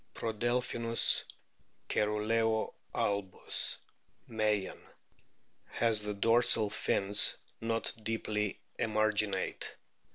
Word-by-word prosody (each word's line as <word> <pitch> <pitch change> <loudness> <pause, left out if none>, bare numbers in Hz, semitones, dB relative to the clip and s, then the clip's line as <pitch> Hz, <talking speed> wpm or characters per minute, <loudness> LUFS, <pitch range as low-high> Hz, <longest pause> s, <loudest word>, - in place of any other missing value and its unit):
Prodelphinus 115 +1 +1 0.6
cceruleo 110 +1 0 0.2
albus, 100 -2 -1 0.5
Meyen,t 105 -3 -1 0.9
has 115 -2 +2
the 105 0 -4
dorsal 115 0 +3
fins 100 0 +3 0.2
not 115 0 0
deeply 105 -2 -2 0.2
emarginate. 105 -3 0
110 Hz, 65 wpm, -32 LUFS, 105-115 Hz, 0.9 s, dorsal